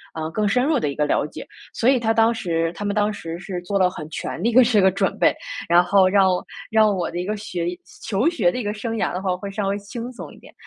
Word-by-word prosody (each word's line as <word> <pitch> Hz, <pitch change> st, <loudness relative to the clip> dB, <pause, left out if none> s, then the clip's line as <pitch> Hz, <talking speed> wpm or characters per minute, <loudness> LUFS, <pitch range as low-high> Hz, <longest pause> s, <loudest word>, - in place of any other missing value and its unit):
呃， 160 Hz, 0 st, -3 dB
更 210 Hz, +4 st, 0 dB
深 250 Hz, +5 st, +2 dB
入 300 Hz, -2 st, +2 dB
的 150 Hz, -, -1 dB
一 140 Hz, -, -5 dB
个 150 Hz, -, +1 dB
了 -, -, +1 dB
解。 -, -, -10 dB, 0.2 s
所 230 Hz, -, -1 dB
以 260 Hz, -1 st, +5 dB
他 225 Hz, -1 st, +1 dB
当 225 Hz, +1 st, +3 dB
时 165 Hz, -6 st, -1 dB
他 205 Hz, -, -7 dB
们 205 Hz, 0 st, -1 dB
当 210 Hz, 0 st, +1 dB
时 165 Hz, -4 st, -6 dB
是 180 Hz, 0 st, -6 dB
做 200 Hz, +3 st, -2 dB
了 185 Hz, -1 st, +3 dB
很 155 Hz, -4 st, -8 dB
全 160 Hz, -, -5 dB
的 225 Hz, -, +2 dB
一 -, -, -1 dB
个 255 Hz, +2 st, +7 dB
这 225 Hz, -3 st, +3 dB
个 190 Hz, -, +5 dB
准 190 Hz, -, -1 dB
备， -, -, +5 dB, 0.4 s
然 175 Hz, +1 st, +5 dB
后 185 Hz, +1 st, +4 dB
让 195 Hz, 0 st, +4 dB, 0.4 s
让 215 Hz, -2 st, +4 dB
我 175 Hz, -2 st, -2 dB
的 175 Hz, -, -4 dB
一 180 Hz, -, -3 dB
个 210 Hz, +2 st, -2 dB
学 180 Hz, -5 st, -4 dB, 0.3 s
求 220 Hz, +6 st, 0 dB
学 230 Hz, -, +2 dB
的 -, -, -5 dB
一 250 Hz, -, -2 dB
个 205 Hz, 0 st, -2 dB
生 225 Hz, +2 st, -4 dB
涯 -, -, 0 dB
的 180 Hz, -, -2 dB
话 185 Hz, -2 st, 0 dB
会 200 Hz, +2 st, -6 dB
稍 200 Hz, 0 st, -2 dB
微 200 Hz, +1 st, 0 dB
轻 235 Hz, +4 st, -7 dB
松 250 Hz, -, -9 dB
一 -, -, -16 dB
点。 -, -, -17 dB
200 Hz, 310 characters per minute, -22 LUFS, 180-225 Hz, 0.4 s, 个